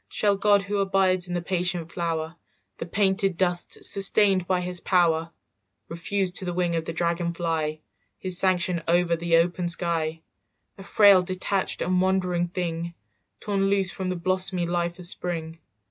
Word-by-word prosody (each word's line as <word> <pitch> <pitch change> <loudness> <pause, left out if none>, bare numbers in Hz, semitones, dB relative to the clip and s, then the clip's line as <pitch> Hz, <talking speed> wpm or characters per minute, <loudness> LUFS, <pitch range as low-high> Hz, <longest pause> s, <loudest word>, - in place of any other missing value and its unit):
"Shall 205 -1 +1
God 200 0 +3
who 205 +1 -3
abides 190 -2 +1
in 175 - -4
the 175 - -3
patient 175 -2 -2
flower, 165 -1 -3 0.4
The 165 - -5
painted 195 -1 +1
dust 180 -2 -1
sustained 195 -2 +4
by 185 -1 0
his 180 0 +1
power, 165 -3 +1 0.6
"Refuse 185 +3 -2
to 185 - -5
the 175 -1 -4
wing 175 -2 0
of 165 -1 -2
the - - -4
dragonfly 165 -2 -2 0.3
His 185 -2 -1
sanction 180 -2 0
over 170 0 +2
the 165 0 +1
open 175 +1 0
sky, 165 -2 -2 0.6
"A - - -9
frail 200 -1 +5
detached 185 +1 -2
and 180 +1 +1
wandering 180 -2 0
thing 170 -1 -4 0.5
Torn 200 -2 -1
loose 195 -2 +1
from 185 -1 -4
the 185 - -2
blossomy 185 0 0
life 170 0 -2
of 180 - -7
spring? 165 -2 -4
180 Hz, 160 wpm, -25 LUFS, 170-190 Hz, 0.6 s, frail